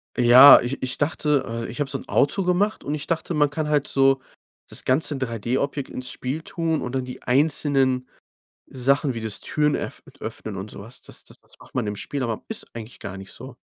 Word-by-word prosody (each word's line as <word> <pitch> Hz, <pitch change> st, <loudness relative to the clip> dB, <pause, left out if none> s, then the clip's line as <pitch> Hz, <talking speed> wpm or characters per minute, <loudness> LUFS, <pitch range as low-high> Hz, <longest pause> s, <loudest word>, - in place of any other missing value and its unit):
Ja, 125 Hz, +3 st, +9 dB
ich 125 Hz, +3 st, -4 dB
ich 130 Hz, -, -3 dB
dachte, 150 Hz, -1 st, +1 dB
äh, 115 Hz, 0 st, -4 dB
ich 125 Hz, -, -8 dB
hab 140 Hz, -, -1 dB
so -, -, -2 dB
'n -, -, -12 dB
Auto 190 Hz, +8 st, +2 dB
gemacht 185 Hz, +4 st, +1 dB
und 145 Hz, -, -2 dB
ich 150 Hz, -1 st, -6 dB
dachte, 165 Hz, +1 st, -2 dB
man 150 Hz, -2 st, +3 dB
kann 150 Hz, +1 st, -3 dB
halt 145 Hz, -1 st, +1 dB
so 135 Hz, -1 st, +3 dB, 0.5 s
das -, -, -5 dB
ganze 145 Hz, +3 st, +1 dB
3D-Objekt 130 Hz, +3 st, -2 dB
ins 125 Hz, 0 st, -4 dB
Spiel 135 Hz, +5 st, -4 dB
tun 165 Hz, -2 st, -2 dB
und 125 Hz, +1 st, -4 dB
dann 130 Hz, -1 st, -1 dB
die 125 Hz, -, -9 dB
einzelnen 135 Hz, -2 st, +2 dB, 0.6 s
Sachen 135 Hz, +2 st, +1 dB
wie 115 Hz, -, -4 dB
das 110 Hz, -2 st, -3 dB
Türen 150 Hz, -1 st, 0 dB
öff -, -, -6 dB
d -, -, -19 dB
öffnen 110 Hz, -3 st, -5 dB
und 95 Hz, +2 st, -6 dB
so -, -, -10 dB
was 115 Hz, +5 st, -10 dB
das -, -, -11 dB
das -, -, -14 dB
das -, -, -20 dB
macht -, -, -18 dB
man -, -, -1 dB
im 105 Hz, 0 st, -3 dB
Spiel, 140 Hz, +6 st, -4 dB
aber 115 Hz, -3 st, -3 dB
ist 225 Hz, -, -2 dB
eigentlich 115 Hz, +1 st, -9 dB
gar 95 Hz, -1 st, -6 dB
nicht 95 Hz, -1 st, -10 dB
so. -, -, -10 dB
135 Hz, 225 wpm, -23 LUFS, 120-150 Hz, 0.6 s, Ja